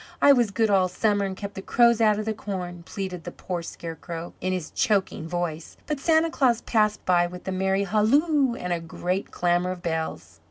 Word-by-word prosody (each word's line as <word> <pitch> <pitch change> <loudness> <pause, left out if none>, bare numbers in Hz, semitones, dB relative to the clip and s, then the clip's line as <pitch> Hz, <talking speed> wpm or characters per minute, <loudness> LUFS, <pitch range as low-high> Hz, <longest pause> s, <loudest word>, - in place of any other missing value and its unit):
I 285 - +7
was 240 -5 +2
good 220 +1 +1
all 190 -2 +4
summer 205 +2 +1
and 190 -1 -4
kept 200 0 -6
the 195 - -6
crows 235 +2 +3
out 215 -2 +4
of 215 - -3
the 220 - -1
corn," 180 -4 -5
pleaded 185 -4 -5
the - - -5
poor 180 -2 -5
Scarecrow 165 0 -7
in 185 - -1
his 180 -4 -3
choking 195 -6 0
voice, 170 -2 -4
but 300 -2 -2
Santa 320 +2 +3
Claus 245 -6 +2
passed 215 -2 +1
by 175 -1 +3
with 180 +1 -10
a - - -1
merry 190 +1 +1
halloo 260 - +2
and 180 -6 -3
a 170 - -1
great 180 +3 -3
clamour 175 +1 +1
of 180 - -12
bells. 160 -1 -4
190 Hz, 205 wpm, -25 LUFS, 175-220 Hz, -, I